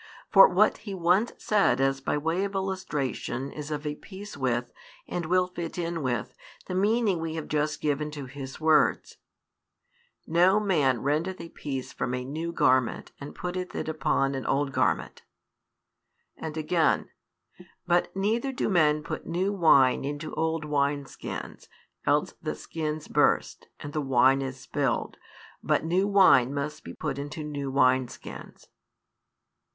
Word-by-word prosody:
For - - +9
what - - +3
He 200 -3 -6
once 185 +6 +2
said 210 -8 +2
as 135 0 +1
by 140 - -1
way 165 +5 0
of 200 0 -3
illustration 150 - -3
is 150 0 -7
of 150 0 -4
a 150 - -1
piece 200 +6 -10
with, 125 -3 -1 0.3
and 170 -2 -3
will 180 +1 +3
fit 175 -2 -6
in 170 -1 -2
with, 125 -4 -2 0.3
the - - -5
meaning 205 0 +2
we 160 0 -4
have 160 - -5
just 150 0 -1
given 150 0 0
to 145 -2 -7
His 135 0 -8
words: 155 -1 +2 1.1
No 180 +5 +4
man 145 - +1
rendeth 160 +7 -1
a 165 - -8
piece 135 -5 -5
from 125 +1 -2
a 125 0 -4
new 160 +5 -4
garment 130 -6 +1
and 140 - -8
putteth 180 0 -4
it - - -3
upon 140 -3 0
an 135 -1 -3
old 140 0 +1
garment; - - 0 1.1
and 160 -1 -6
again: 160 +1 +1 0.7
But 175 0 +2
neither 225 +7 0
do 255 - -1
men 155 -5 +3
put - - -6
new 185 +4 0
wine 140 -10 +5
into 145 +2 -5
old 160 -1 -1
wine 145 -1 0
skins; - - -8 0.4
else - - +2
the - - -3
skins 155 -1 -4
burst, - - +1
and 145 - -8
the 155 - -1
wine 135 0 +4
is 135 -1 -5
spilled. 140 -5 -2 0.4
But - - +1
new 185 +4 +2
wine 185 -11 +5
must 150 +2 -4
be - - -9
put 140 -3 -3
into 150 +2 -5
new 145 -2 -4
wine 130 -1 +3
skins. - - -11
150 Hz, 155 wpm, -27 LUFS, 140-180 Hz, 1.1 s, For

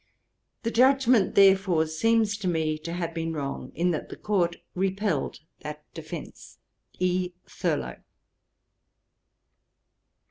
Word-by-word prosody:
The 230 - -1
judgement, 255 -4 +4
therefore, 190 -4 +5
seems 215 +6 +2
to 195 - -3
me 160 -3 0
to 170 +2 -6
have 170 -1 -3
been 165 0 -2
wrong, 140 -3 -4
in 175 +2 +2
that 155 - -3
the - - -7
Court 175 -5 0 0.2
repelled 190 -5 -1 0.2
that 150 0 -7
defence. 160 -1 -9 0.4
'E. 180 0 0
THURLOW.' - - -2
180 Hz, 110 wpm, -27 LUFS, 160-200 Hz, 0.4 s, therefore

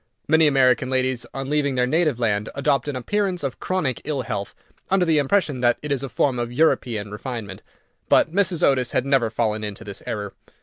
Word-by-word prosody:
Many 160 0 +5
American 130 -2 +3
ladies 130 -1 -1
on 135 0 -5
leaving 145 -3 +1
their 125 0 +2
native 155 -1 +1
land 110 -3 0
adopt 140 -1 +1
an 145 - -3
appearance 185 - -1
of 135 -3 -3
chronic 155 -9 -1
ill 140 -3 -2
health, 100 -3 -4 0.3
under 190 -1 +3
the 160 -3 +3
impression 145 -2 +1
that 120 -1 +3
it 150 - -4
is 140 -2 0
a 135 - -5
form 125 +2 0
of 120 0 -3
European 120 -7 +1
refinement, 105 -3 -6 0.5
but 160 - +4
Mrs. 180 -3 +1
Otis 130 -3 +2
had 130 - +1
never 135 -5 +2
fallen 110 -1 -1
into 105 0 -6
this 100 -2 -8
error. 105 -2 -4
130 Hz, 200 wpm, -23 LUFS, 120-150 Hz, 0.5 s, Many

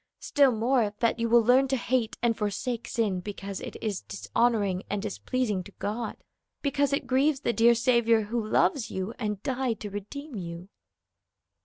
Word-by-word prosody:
Still 280 -2 +3
more, 230 -2 +1
that 230 0 +1
you 230 0 0
will 235 0 +6
learn 255 +4 +5
to 265 - +1
hate 240 -2 -1
and 235 -1 +3
forsake 225 +3 -3
sin 210 -6 0
because 195 0 -6
it - - -7
is 210 -4 -2
dishonoring 205 -4 0
and 205 - -1
displeasing 210 0 -2
to - - -11
God, 220 +2 -4 0.5
because 285 -1 +1
it 280 -1 0
grieves 265 +2 +2
the 235 - 0
dear 235 +2 +5
Saviour 235 -1 +3
who 225 +2 -2
loves 235 +4 +1
you 190 +4 -4
and 210 -3 -3
died 255 -4 -1
to 205 - -5
redeem 275 +9 -7
you." 175 -1 -7
230 Hz, 170 wpm, -28 LUFS, 205-255 Hz, 0.5 s, will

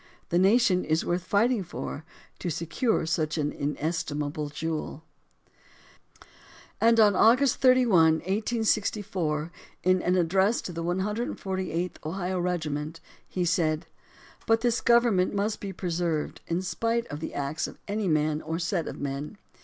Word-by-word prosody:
The 175 - +2
nation 195 -1 +4
is 155 +1 0
worth 175 0 -1
fighting 220 +4 +2
for, 160 -3 -6 0.4
to 180 - -3
secure 170 - 0
such 155 -1 -1
an 150 -1 0
inestimable 150 0 -3
jewel. 160 0 -4 1.8
And 230 0 +5
on 205 -2 +6
August 250 +5 +4
31, 235 -11 +5
1864, 200 -6 -1 0.3
in 185 0 +3
an 180 - +1
address 190 +5 +2
to 180 - -6
the 165 0 -4
148th 190 -2 -2
Ohio 180 +3 -2
Regiment; 160 -3 -2 0.3
he 180 -1 -2
said: 160 -2 +1 0.6
But 225 0 +3
this 240 -1 +1
government 235 -6 +3
must 205 +2 -1
be 200 - -5
preserved 170 -4 -2
in 170 +2 -1
spite 230 +5 -1
of 145 - -5
the 160 - -6
acts 140 +2 -2
of - - -11
any 205 0 -1
man 155 -1 +1
or 160 +1 -3
set 175 0 -1
of - - -6
men. 140 +7 -4
180 Hz, 140 wpm, -27 LUFS, 160-210 Hz, 1.8 s, on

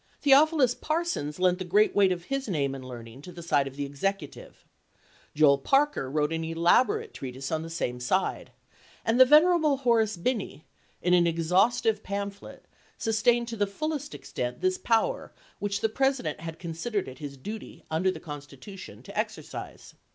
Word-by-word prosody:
Theophilus 285 -2 +5
Parsons 310 - -2
lent 180 0 +2
the - - -2
great 205 +4 +3
weight 195 -2 +5
of 175 -1 -3
his 275 +5 -3
name 140 -6 0
and 135 -1 -7
learning 120 0 -10
to 180 - -10
the 170 -1 -10
side 145 -4 +2
of 135 - -9
the 145 0 -3
Executive; 145 +3 -5 0.7
Joel 145 -2 +5
Parker 275 - +1
wi'ote 150 +1 0
an 165 0 -2
ela 165 +7 +4
borate 435 - -4
treatise 130 0 -6
on 160 -1 0
the 165 - -7
same 125 -7 -3
side; 155 +10 -1 0.5
and 225 +2 +2
the 260 - +10
venerable 305 0 +5
Horace 225 -6 +2
Binney, 190 - -3 0.4
in 180 - +3
an 175 -1 +5
exhaustive 200 +7 +2
pamphlet, 200 0 -6 0.3
sustained 235 +1 +2
to 230 - -4
the 205 -2 0
fullest 295 +6 -4
extent 125 0 -5
this 370 0 +1
power 225 -1 0 0.3
which 200 0 -2
the - - +3
President 265 - 0
had 165 0 -7
considered 175 +5 -3
it 130 0 -10
his 140 -2 -7
duty 210 +11 -8
under 165 +4 +1
the 185 - -4
Constitution 145 +5 -10
to - - -11
exercise. - - -5
190 Hz, 170 wpm, -27 LUFS, 150-240 Hz, 0.7 s, the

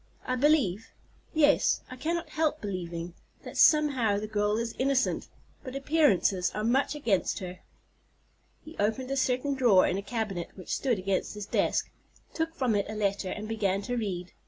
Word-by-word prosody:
I 255 - 0
believe—yes, 290 - +1
I - - -6
cannot 330 +6 -2
help 310 -1 0
believing—that 175 -3 -7
somehow 270 -9 +4
the 210 - -3
girl 210 0 0
is 230 0 -2
innocent; 270 0 +1 0.4
but 255 -1 -7
appearances 275 - +2
are 210 - -2
much 265 +6 +1
against 230 -10 0
her." 180 -2 -7 1.1
He 315 +1 -11
opened 225 +6 0
a - - 0
certain 260 +1 +1
drawer 240 -8 +5
in 190 - 0
a - - -4
cabinet 200 -4 -3
which 185 - -3
stood 235 -9 -1
behind 195 -1 +1
his 210 -1 -6
desk, - - 0 0.4
took 325 0 -2
from 250 -4 +1
it 200 -1 0
a 215 - -5
letter, 200 -2 -1
and 215 +2 -5
began 200 -3 -1
to 245 +4 -3
read. 185 -6 -4
225 Hz, 160 wpm, -28 LUFS, 195-275 Hz, 1.1 s, drawer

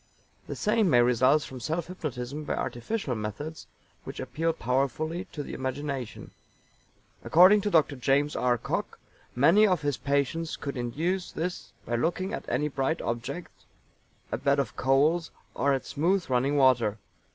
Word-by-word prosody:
The - - -5
same 210 -2 +2
may 120 -4 +5
result 130 +5 +3
from 130 - -8
self 160 +6 -2
hypnotism 150 -5 -5
by - - -2
artificial 135 - -3
methods 115 +9 -6 0.4
which - - -8
appeal 150 +6 -1
powerfully 155 - -1
to 150 -6 -7
the - - -8
imagination. 130 -1 -4 0.9
According 185 +5 +6
to 205 - -1
Dr. 155 -6 +3
JAMES 140 +3 +1
R. 125 -1 +2
COCKE - - -3 0.4
many 165 +12 +5
of 180 -7 +1
his 145 -3 0
patients 140 +4 -1
could 140 -1 -5
induce 160 +10 -2
this 175 +2 -4
by 120 - -1
looking 180 - -1
at - - -5
any 150 - 0
bright 140 +3 -1
object, 120 +9 -4 0.8
a - - -2
bed 140 0 +2
of 140 -5 -1
coals, 150 +6 +2 0.2
or 140 - +1
at 135 -1 -1
smooth 175 +4 0
running 135 +4 +2
water. 120 -6 +3
145 Hz, 150 wpm, -28 LUFS, 130-165 Hz, 0.9 s, According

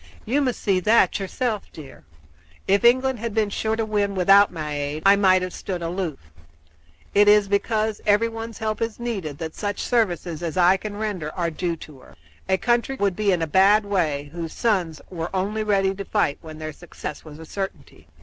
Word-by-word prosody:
You 265 +6 +1
must 255 -3 -1
see 195 -2 +1
that 215 +4 +3
yourself, 210 +2 -3
dear. 140 - -12 0.6
If 200 +3 +3
England 255 +1 +4
had 230 -1 -4
been 215 -2 +1
sure 220 +2 -1
to 225 0 -1
win 205 -2 0
without 195 +2 +5
my 155 -3 -5
aid, 145 +2 -3
I 195 +1 +7
might 185 -2 +4
have 185 - -4
stood 180 -3 -5
aloof. 170 -3 -3 1.0
It 205 0 +5
is 205 -1 +6
because 215 +2 0
everyone's 225 +2 0
help 215 -1 -3
is 230 0 -2
needed 195 -12 -4
that 160 0 -5
such 205 -1 -4
services 175 -8 0
as 170 0 -4
I 180 +1 +5
can 205 +1 -6
render 200 -8 -3
are 170 -2 -1
due 170 +1 -2
to 150 -4 -13
her. 110 - -17 0.3
A 190 - +3
country 240 +4 +1
would 200 -7 0
be 210 0 +1
in 175 -3 +1
a - - +1
bad 195 +6 +4
way 155 -8 -1
whose 165 -2 -5
sons 180 -9 0
were 170 -1 -4
only 205 +4 -1
ready 195 -2 +1
to 200 +1 -6
fight 195 -9 0
when 155 -1 -10
their 155 0 -6
success 165 -2 -8
was 150 -2 -11
a 160 - -10
certainty." 195 +4 -7
195 Hz, 195 wpm, -23 LUFS, 170-215 Hz, 1.0 s, I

